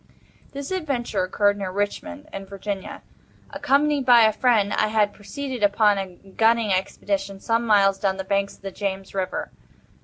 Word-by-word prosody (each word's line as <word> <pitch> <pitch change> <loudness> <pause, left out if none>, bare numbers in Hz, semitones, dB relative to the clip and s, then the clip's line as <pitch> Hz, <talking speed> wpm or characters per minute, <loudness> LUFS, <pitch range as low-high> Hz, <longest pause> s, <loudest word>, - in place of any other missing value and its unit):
This 280 +2 -6
adventure 265 - -1
occurred 205 +2 +1
near 195 -2 -3
Richmond, 285 +10 -4
in 195 0 -7
Virginia. 200 0 -6 0.5
Accompanied 285 +1 +1
by 240 -2 +7
a 220 - +5
friend, 220 -5 +2
I 215 - +2
had 210 -1 +1
proceeded, 260 +3 -6
upon 205 0 +3
a 190 -2 -6 0.2
gunning 225 -2 +3
expedition, 195 +1 -2
some 230 +3 0
miles 195 -2 +4
down 190 -1 0
the 190 - -3
banks 200 +1 -1
of - - -27
the 195 - -5
James 195 -1 -4
River. 190 -1 -3
205 Hz, 160 wpm, -23 LUFS, 195-235 Hz, 0.5 s, by